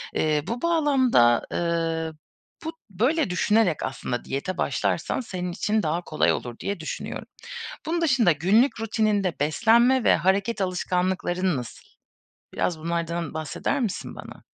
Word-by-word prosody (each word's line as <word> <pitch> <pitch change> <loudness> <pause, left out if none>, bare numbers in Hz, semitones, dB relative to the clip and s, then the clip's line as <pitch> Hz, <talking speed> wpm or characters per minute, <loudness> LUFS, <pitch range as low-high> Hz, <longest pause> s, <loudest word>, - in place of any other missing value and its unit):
Eee, 150 -2 +1
bu 235 +2 -3
bağlamda, 270 - +4
ııı, 165 -1 -1 0.5
bu 325 - -3 0.2
böyle 245 - +1
düşünerek 185 -2 +2
aslında 125 -2 -4
diyete 165 +7 -3
başlarsan - - 0
senin 180 -6 -4
için 210 +3 0
daha 160 +3 0
kolay 155 -3 +1
olur 120 -1 -5
diye 200 -3 -3
düşünüyorum. 160 - -5 0.6
Bunun 335 +2 -1
dışında 260 - +4
günlük 210 - +3
rutininde 210 -6 0
beslenme 235 - +4
ve - - +5
hareket 195 +5 +1
alışkanlıkların 180 -2 0
nasıl? 120 -3 -8 0.7
Biraz 165 -3 -1
bunlardan 170 -1 -2
bahseder 160 - -2
misin 225 -7 -3
bana? - - -11
185 Hz, 130 wpm, -25 LUFS, 160-225 Hz, 0.7 s, ve